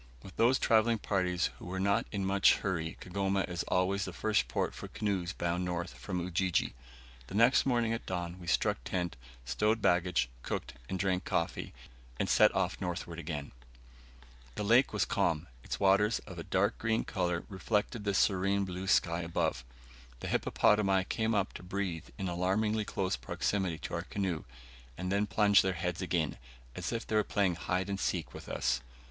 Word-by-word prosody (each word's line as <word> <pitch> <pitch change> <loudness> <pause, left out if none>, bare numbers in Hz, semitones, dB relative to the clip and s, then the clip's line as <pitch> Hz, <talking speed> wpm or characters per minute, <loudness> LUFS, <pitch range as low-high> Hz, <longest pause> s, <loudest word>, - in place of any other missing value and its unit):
With 95 - -11
those 125 +3 +4
travelling 115 -1 +3
parties 90 -4 0
who 90 - -8
are 95 - -2
not 100 +1 +2
in 100 -2 -2
much 95 +1 +5
hurry 85 -5 -2
Kigoma 95 +1 0
is 90 -2 -3
always 95 +2 +1
the 95 - -5
first 105 +3 +1
port - - -1
for - - -7
canoes 95 -5 -2
bound 85 -1 -1
north 90 0 -3
from 90 -3 -4
Ujiji. 90 +1 0 0.5
The - - -7
next 120 +5 +5
morning 120 -3 +2
at 115 - -5
dawn 90 -1 -3
we 85 - -10
struck - - +1
tent, 90 -4 -2 0.3
stowed 105 - +1
baggage, 90 - +2
cooked, - - -4 0.2
and 95 - -1
drank 95 -1 0
coffee, 85 - -2 0.5
and - - +1
set - - +6
off - - 0
northward 85 -2 -4
again. 75 -3 -5 1.0
The - - -2
lake 120 +6 +5
was 105 -4 +1
quite - - -5
calm; 80 0 +1 0.2
its - - -4
waters, 100 +3 +4
of - - -8
a - - -4
dark - - +1
green 110 0 +1
colour, 90 -4 -1
reflected 105 +2 -1
the 100 -1 0
serene 100 +1 +2
blue 95 +1 -5
sky 85 -3 +3
above. 85 -7 -1 0.6
The - - -4
hippopotami 100 -3 +3
came 110 0 0
up 100 0 0
to - - -8
breathe 90 -3 -3
in 95 - -2
alarmingly 100 +5 +1
close 95 -7 -1
proximity 85 +8 -1
to 80 - -7
our 85 - -1
canoe, 90 -3 -3 0.5
and 90 +1 -3
then 100 +1 +2
plunged 105 -1 +5
their 95 0 0
heads 90 +1 -3
again, 85 -5 0 0.4
as - - -3
if 115 - -3
they 110 - -2
were 105 - +4
playing 100 -4 +1
hide 90 +3 -1
and 100 -1 -3
seek 90 -4 -1
with - - -9
us. - - 0
95 Hz, 180 wpm, -32 LUFS, 90-105 Hz, 1.0 s, set